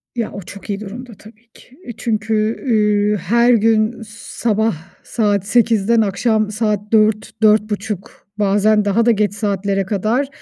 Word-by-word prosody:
Ya, 230 Hz, -2 st, -3 dB
o 200 Hz, -, -7 dB
çok 200 Hz, +3 st, -12 dB
iyi 200 Hz, 0 st, -2 dB
durumda 230 Hz, +4 st, -9 dB
tabii 220 Hz, +2 st, -17 dB
ki. 260 Hz, -, -19 dB, 0.2 s
Çünkü, 220 Hz, -1 st, -1 dB
ııı, 210 Hz, -2 st, +2 dB
her 235 Hz, +7 st, +2 dB
gün 225 Hz, +1 st, +1 dB
sabah 220 Hz, 0 st, -2 dB, 0.3 s
saat 205 Hz, -4 st, -1 dB
8.00'den 230 Hz, 0 st, +2 dB
akşam 215 Hz, +1 st, 0 dB
saat 215 Hz, -1 st, 0 dB
16.00-16.30 215 Hz, -2 st, 0 dB
bazen 210 Hz, +1 st, +2 dB
daha 220 Hz, +3 st, +1 dB
da 235 Hz, -, +5 dB
geç 210 Hz, -2 st, 0 dB
saatlere 200 Hz, -2 st, -1 dB
kadar 220 Hz, +7 st, -1 dB
215 Hz, 130 wpm, -18 LUFS, 205-225 Hz, 0.3 s, da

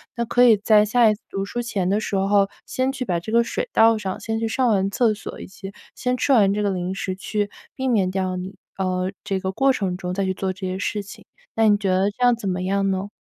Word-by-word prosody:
那 235 Hz, -, -1 dB
可 245 Hz, +2 st, +3 dB
以 230 Hz, -3 st, +7 dB
在 210 Hz, +1 st, +4 dB
下 230 Hz, +1 st, +4 dB
一 -, -, +3 dB
次 210 Hz, -, -26 dB
读 195 Hz, -, -3 dB
书 240 Hz, +4 st, -4 dB
前 205 Hz, -6 st, -2 dB
的 205 Hz, +2 st, +2 dB
时 210 Hz, -, -3 dB
候 195 Hz, +1 st, +3 dB, 0.2 s
先 260 Hz, +1 st, -1 dB
去 265 Hz, -, -4 dB
把 175 Hz, -5 st, 0 dB
这 195 Hz, +6 st, -7 dB
个 235 Hz, 0 st, +5 dB
水 480 Hz, -, -3 dB
倒 225 Hz, 0 st, +5 dB
上， 195 Hz, -3 st, -4 dB
先 225 Hz, 0 st, -2 dB
去 225 Hz, -, -1 dB
上 250 Hz, +3 st, +1 dB
完 195 Hz, -3 st, +2 dB
厕 225 Hz, +2 st, +2 dB
所 210 Hz, -, -8 dB
以 -, -, -7 dB
及 195 Hz, +1 st, -9 dB, 0.2 s
先 250 Hz, 0 st, -1 dB
吃 280 Hz, -, 0 dB
完 200 Hz, -5 st, +5 dB
这 210 Hz, +1 st, -1 dB
个 205 Hz, -, +1 dB
零 185 Hz, 0 st, -3 dB
食 190 Hz, -1 st, -3 dB
去 205 Hz, +2 st, -2 dB, 0.3 s
避 265 Hz, 0 st, -2 dB
免 200 Hz, -6 st, +2 dB
掉 185 Hz, -1 st, -2 dB
你 185 Hz, +2 st, -6 dB, 0.2 s
呃， 185 Hz, -1 st, -1 dB
这 195 Hz, -1 st, -1 dB
个 190 Hz, -1 st, -2 dB
过 270 Hz, +7 st, +3 dB
程 190 Hz, -6 st, -2 dB
中 180 Hz, -1 st, -4 dB
再 195 Hz, +1 st, -1 dB
去 190 Hz, -, 0 dB
做 190 Hz, 0 st, -2 dB
这 190 Hz, +1 st, -7 dB
些 185 Hz, 0 st, -3 dB
事 205 Hz, +1 st, -2 dB
情， 200 Hz, -, -13 dB, 0.3 s
那 225 Hz, 0 st, +3 dB
你 205 Hz, -, +5 dB
觉 200 Hz, -2 st, -2 dB
得 190 Hz, +2 st, +2 dB
这 205 Hz, -, -13 dB
样 245 Hz, 0 st, +6 dB
怎 225 Hz, -3 st, -6 dB
么 180 Hz, 0 st, -2 dB
样 195 Hz, +1 st, 0 dB
呢？ 190 Hz, +1 st, -2 dB
200 Hz, 290 characters per minute, -22 LUFS, 190-225 Hz, 0.3 s, 以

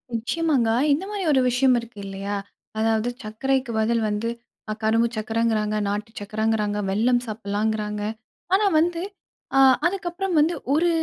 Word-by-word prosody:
நிச்சயமாங்க. 265 Hz, 0 st, +1 dB, 0.2 s
இந்த 320 Hz, +7 st, -1 dB
மாரி 410 Hz, -2 st, -3 dB
ஒரு 265 Hz, -2 st, +4 dB
விஷயம் 250 Hz, +1 st, +3 dB
இருக்கு 235 Hz, -3 st, -11 dB
இல்லையா? 195 Hz, +1 st, -4 dB, 0.4 s
அதாவது 225 Hz, +1 st, +1 dB
சக்கரைக்கு 260 Hz, +4 st, -1 dB
பதில் 230 Hz, +1 st, +1 dB
வந்து, 210 Hz, +3 st, -1 dB, 0.4 s
அ -, -, 0 dB
கரும்பு 225 Hz, +2 st, +3 dB
சக்கரைங்கிறாங்க, 215 Hz, -1 st, 0 dB
நாட்டு 210 Hz, +2 st, -3 dB
சக்கரங்கிறாங்க, 215 Hz, 0 st, -1 dB
வெல்லம் 240 Hz, +5 st, +2 dB
சாப்பிடலாங்கிறாங்க. 210 Hz, 0 st, -2 dB, 0.5 s
ஆனா 415 Hz, +2 st, +4 dB, 0.2 s
வந்து 340 Hz, 0 st, 0 dB, 0.6 s
ஆ -, -, +6 dB, 0.3 s
அதுக்கப்புறம் 360 Hz, 0 st, -1 dB
வந்து 320 Hz, +4 st, +3 dB, 0.2 s
ஒரு 340 Hz, +3 st, +3 dB
225 Hz, 130 wpm, -24 LUFS, 215-270 Hz, 0.6 s, ஆ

